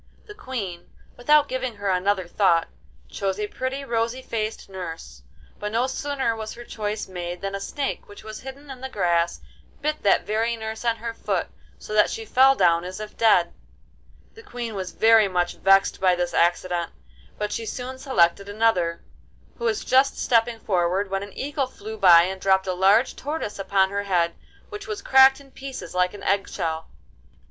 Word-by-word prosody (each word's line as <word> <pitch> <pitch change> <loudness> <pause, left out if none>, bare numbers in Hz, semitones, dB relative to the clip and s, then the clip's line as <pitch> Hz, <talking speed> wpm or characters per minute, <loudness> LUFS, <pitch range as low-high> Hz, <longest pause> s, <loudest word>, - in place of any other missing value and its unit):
The 420 - -10
Queen, 220 - -6 0.3
without 295 +4 +4
giving 255 -2 -3
her 200 -1 -1
another 185 0 0
thought, 175 -2 +2 0.4
chose 195 - -3
a 210 - 0
pretty 260 +5 -4
rosy 235 +1 -1
faced 220 -2 -4
nurse, 165 - -8 0.4
but 210 0 -4
no 235 +3 +1
sooner 265 -3 -2
was 220 -1 -6
her 240 - -9
choice 215 -2 -4
made 175 -1 -6
than 195 0 -4
a 195 - -3
snake, 275 +8 -4
which 205 - -13
was 215 0 -8
hidden 275 +2 -10
in 255 -1 -10
the 265 - -5
grass, 170 -6 0 0.4
bit 305 +1 -2
that 200 - +3
very 225 +2 0
nurse 220 0 -6
on 230 -1 +2
her 230 0 -5
foot, - - -2 0.3
so - - -8
that 210 -1 +4
she 225 - -5
fell 265 +4 +5
down 170 -6 +3
as 185 +2 -7
if 215 0 -8
dead. 185 -7 +3 0.8
The 455 - -13
Queen 245 - -6
was 190 -2 -4
very 225 -2 +5
much 180 -2 -1
vexed 195 +1 +3
by 185 -1 +4
this 175 0 -2
accident, 175 0 +1 0.5
but 210 0 -3
she 225 +1 -4
soon 255 +2 -5
selected 200 -7 +2
another, 205 -6 +1 0.6
who 470 - -3
was 425 -3 0
just 265 +1 +3
stepping 230 -1 +1
forward 190 0 0
when 195 0 -1
an 200 0 -9
eagle 280 -1 -2
flew 220 -3 -9
by 175 -5 +7
and 190 +1 -4
dropped 190 -1 +3
a 185 - -1
large 195 +7 +3
tortoise 290 -8 -4
upon 195 -1 +2
her 200 0 -1
head, 175 -3 +1 0.4
which 415 -1 -8
was 420 -2 -5
cracked 265 0 +6
in 275 -1 -17
pieces 270 0 -8
like 180 +2 +1
an 205 - -10
egg 200 0 +1
shell. 160 -3 -3
210 Hz, 185 wpm, -24 LUFS, 185-255 Hz, 0.8 s, by